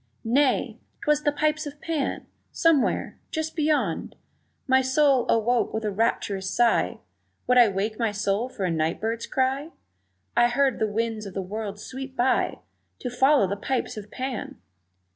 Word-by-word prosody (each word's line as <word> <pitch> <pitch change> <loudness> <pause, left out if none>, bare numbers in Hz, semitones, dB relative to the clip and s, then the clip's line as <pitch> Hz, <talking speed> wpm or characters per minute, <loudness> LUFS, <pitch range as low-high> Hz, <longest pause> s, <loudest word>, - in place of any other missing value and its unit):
Nay! 240 -2 +2 0.2
'twas 300 0 +2
the 295 - +2
pipes 305 +1 0
of 290 0 -9
Pan! 315 -4 -2 0.3
Somewhere 330 -5 +1
just 315 0 -3
beyond 295 - 0 0.5
My 260 -1 +4
soul 265 -1 +3
awoke 230 +1 +2
with 220 0 -2
a 210 - 0
rapturous 200 -2 -1
sigh 240 -1 +2 0.5
(Would 250 0 +5
I 240 - +8
wake 210 +3 -2
my 230 -2 +1
soul 205 +4 -1
for 200 -6 -4
a 180 - 0
night 160 +1 0
bird's 225 +1 -2
cry?) 270 +3 0 0.7
I 240 - +5
heard 265 +1 +1
the 220 -1 0
winds 220 -1 -2
of 190 - -10
the 195 - -1
worlds 205 +1 -5
sweep 265 0 -7
by 250 +2 +1 0.4
To 250 - -5
follow 265 -1 +4
the 195 +2 -2
pipes 260 +5 -2
of 210 -1 -8
Pan! 255 0 -5
240 Hz, 160 wpm, -25 LUFS, 210-275 Hz, 0.7 s, I